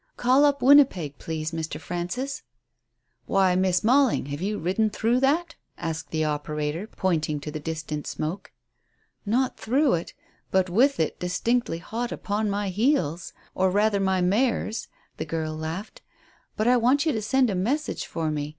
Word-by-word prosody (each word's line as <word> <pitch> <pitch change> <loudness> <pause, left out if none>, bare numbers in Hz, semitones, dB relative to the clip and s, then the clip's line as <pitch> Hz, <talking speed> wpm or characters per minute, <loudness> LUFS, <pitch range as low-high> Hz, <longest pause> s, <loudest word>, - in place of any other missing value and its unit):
Call 260 +4 +4
up 280 -3 +1
Winnipeg, 250 - +5
please, 160 0 -4
Mr. 160 -1 -4
Frances." 180 - -4 0.9
"Why, 190 -2 +3
Miss 185 0 +2
Mailing, 255 - +3
have 145 +3 -4
you 210 +2 -1
ridden 190 +7 +1
through 230 +4 +1
that?" 320 +5 +1 0.2
asked 160 -1 -4
the 155 -1 0
operator, 150 +4 -2
pointing 160 -8 -1
to 150 - -6
the 155 - -5
distant 155 -1 -5
smoke. 160 +6 -4 0.8
"Not 250 +4 +1
through 270 +5 +2
it, 170 -1 -3 0.3
but 185 -1 +1
with 265 +9 +3
it 160 - -1
distinctly 180 +3 0
hot 230 +8 -4
upon 210 +1 -2
my 200 0 -1
heels 185 - 0 0.2
or 190 0 +2
rather 205 +1 +2
my 190 -1 +1
mare's," 220 +4 0 0.3
the - - -3
girl 160 -1 -3
laughed. 160 +7 -6 0.6
"But 215 - +1
I 250 0 +5
want 260 +6 +3
you 315 - +3
to 220 - -2
send 250 +3 +2
a - - -1
message 260 +12 -1
for 160 -2 -2
me. 150 -1 -3
195 Hz, 160 wpm, -25 LUFS, 160-245 Hz, 0.9 s, Winnipeg